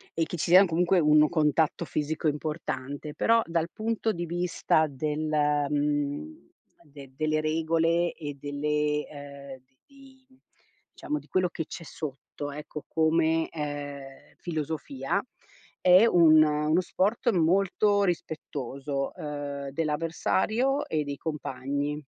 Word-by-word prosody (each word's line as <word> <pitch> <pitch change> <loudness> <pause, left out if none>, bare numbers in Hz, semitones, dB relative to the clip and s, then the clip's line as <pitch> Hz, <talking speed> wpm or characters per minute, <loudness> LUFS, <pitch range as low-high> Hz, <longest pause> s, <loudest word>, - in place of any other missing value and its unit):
E 165 - +1
che 175 - -6
ci 165 - -2
sia 190 +2 +9
comunque 175 +2 +2
un 150 -1 +5
contatto 160 0 +1
fisico 155 +1 -2
importante, 150 -1 -4
però 230 0 +3
dal 165 -1 -1
punto 225 0 -1
di 175 -4 -4
vista 170 -2 +1
del 150 +3 -2 0.4
mhmm, 145 - -2 0.3
de 140 -4 -13
delle 155 +1 0
regole 165 +2 +1
e 145 -3 -7
delle 150 +1 -1
ehm, 140 -2 -10 0.3
di 270 -1 -19 0.7
diciamo 300 - -2
di - - -18
quello 185 -1 +2
che 165 -2 -5
c'è 165 - -8
sotto, 145 -1 -7
ecco, 150 +1 -7
come, 160 0 +2
ehm, 145 -3 -7
filosofia 155 0 -3 0.6
è 185 +4 +7
un 160 -7 +6
uno 150 +3 +2
sport 210 +7 0
molto 195 +3 +2
rispettoso, 140 -5 -3
uhm, 145 -2 -5
dell'avversario 165 - 0
e 155 -1 -1
dei 145 0 -4
compagni. 145 -1 -3
155 Hz, 120 wpm, -27 LUFS, 145-170 Hz, 0.7 s, sia